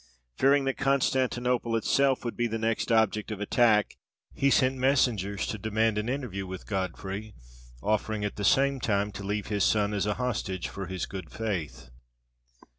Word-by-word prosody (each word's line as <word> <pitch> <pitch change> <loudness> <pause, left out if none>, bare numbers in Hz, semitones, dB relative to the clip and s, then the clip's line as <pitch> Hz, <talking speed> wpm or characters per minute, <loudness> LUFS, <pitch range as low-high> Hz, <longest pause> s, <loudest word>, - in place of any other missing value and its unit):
Fearing 140 - +4
that 135 -1 -1
Constantinople 125 -3 +1
itself 135 +4 +2
would 120 - -3
be 120 - 0
the 115 0 -3
next 115 +1 -1
object 110 -1 +2
of 110 -2 -5
attack, 105 0 +2 0.4
he 140 - +2
sent 130 0 +3
messengers 120 -7 +1
to 110 - -4
demand 110 0 +1
an 110 +3 -3
interview 120 -8 -3
with 95 0 -7
Godfrey, 95 +2 -4 0.5
offering 110 0 0
at 105 - -3
the 105 - -4
same 135 +5 +3
time 105 -3 0
to 100 0 -8
leave 105 +2 -3
his 100 -2 +1
son 105 -1 +2
as 100 0 0
a 105 - 0
hostage 110 -7 -2
for 100 -2 -6
his 95 0 -3
good 95 -4 -7
faith. 85 - -4
110 Hz, 170 wpm, -28 LUFS, 100-125 Hz, 0.5 s, Fearing